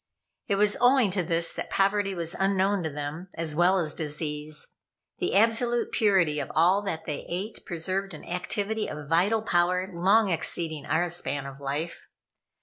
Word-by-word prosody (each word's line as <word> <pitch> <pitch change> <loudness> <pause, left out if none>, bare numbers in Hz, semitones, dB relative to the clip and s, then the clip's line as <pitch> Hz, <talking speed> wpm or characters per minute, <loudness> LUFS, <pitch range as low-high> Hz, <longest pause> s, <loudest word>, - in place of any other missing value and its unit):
It 200 - +1
was 205 +1 +2
owing 245 -4 +5
to 185 0 0
this 165 -1 0
that - - -5
poverty 195 0 +1
was 170 0 -2
unknown 195 0 +1
to 160 - -2
them, 150 +4 -5
as 160 -2 -2
well 180 +3 +4
as 155 -5 +1
disease. 150 -1 -3 0.5
The - - -1
absolute 230 +3 +2
purity 190 -9 +3
of - - -4
all 180 +5 +4
that 180 -6 -4
they 150 - -4
ate 195 +6 -4
preserved 185 +2 -2
an - - -11
activity 205 +4 -2
of 150 -1 -7
vital 195 +8 +2
power 180 0 +1
long 195 +5 +3
exceeding 160 -2 -2
our 170 +3 +1
span 145 -5 -2
of 140 0 -9
life. 145 +5 -4
175 Hz, 165 wpm, -27 LUFS, 160-200 Hz, 0.5 s, owing